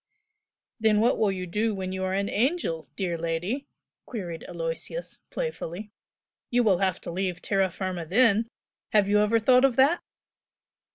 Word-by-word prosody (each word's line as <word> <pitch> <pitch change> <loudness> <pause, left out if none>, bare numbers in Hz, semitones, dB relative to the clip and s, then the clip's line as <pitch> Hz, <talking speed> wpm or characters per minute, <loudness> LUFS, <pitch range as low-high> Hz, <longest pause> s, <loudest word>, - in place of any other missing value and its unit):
"Then 215 -1 +4
what 230 +3 +3
will 210 -3 +3
you 185 -1 -4
do 210 +5 0
when 185 -1 -4
you 190 0 -3
are 185 0 -1
an 200 +1 0
angel, 205 - 0
dear 175 -4 -2
lady?" 175 - -2 0.4
queried 175 -8 -5
Aloysius, 170 - -5
playfully 210 - -5 0.6
"You 245 0 +3
will 195 -5 +3
have 190 -3 +1
to - - -6
leave 180 0 -2
terra 195 -1 +1
firma 185 -1 -4
then! 225 +3 +4 0.5
Have 210 -2 +5
you 205 +1 +4
ever 210 +2 +3
thought 250 +3 +5
of 270 -3 +4
that?" 280 +7 +4
200 Hz, 160 wpm, -27 LUFS, 180-230 Hz, 0.6 s, Have